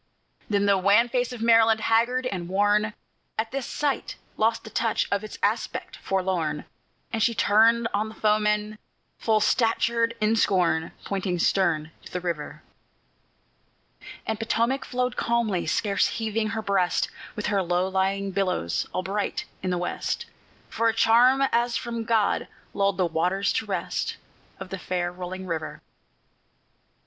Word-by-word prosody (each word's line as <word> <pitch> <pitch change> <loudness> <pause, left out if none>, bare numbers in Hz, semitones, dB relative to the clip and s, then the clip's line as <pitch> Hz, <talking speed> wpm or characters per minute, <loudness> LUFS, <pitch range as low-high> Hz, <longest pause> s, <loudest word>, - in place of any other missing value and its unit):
Then 200 -1 +2
the 200 -1 +4
wan 205 +5 +4
face 245 0 0
of 240 -2 -5
Maryland, 225 -1 +5
haggard 235 +3 +2
and 180 -8 -3
worn, 205 +2 +2 0.4
At 225 +1 -2
this 270 -1 -3
sight 290 -2 -2 0.2
lost 225 +1 +1
the 220 - -10
touch 225 -2 0
of 200 +1 0
its 215 - -8
aspect - - -1
forlorn, 180 -6 -1 0.5
And 225 - -1
she 230 +1 +2
turned 225 +3 +4
on 210 +2 0
the 220 - -12
foemen, 210 0 +1 0.4
full 220 -1 +2
statured 230 +1 +2
in 215 +1 +2
scorn, 175 -6 +2
Pointing 190 -2 -2
stern 160 -3 +1
to - - -13
the 180 - -2
river. 170 -4 -5 1.6
And 220 -1 -2
Potomac 235 +4 0
flowed 250 0 -2
calmly, 225 -8 0
scarce 200 +5 +1
heaving 220 -1 -1
her 220 +1 -3
breast, 195 -3 +1 0.2
With 210 - -4
her 200 -1 +1
low 180 +1 0
lying 195 +1 0
billows 185 - -1
all 185 - -1
bright 200 +3 -2 0.2
in 185 - -2
the 180 - 0
west, 175 - -2 0.4
For 230 - 0
a 225 - -1
charm 245 +4 +5
as 235 0 +1
from 235 -1 -4
God 220 -3 +1 0.3
lulled 200 -2 +1
the 185 - +2
waters 180 +4 0
to - - -2
rest - - -2 0.4
Of - - -7
the 190 - -5
fair 175 0 -2
rolling 185 +1 -6
river. 160 -3 -4
210 Hz, 150 wpm, -25 LUFS, 185-230 Hz, 1.6 s, Maryland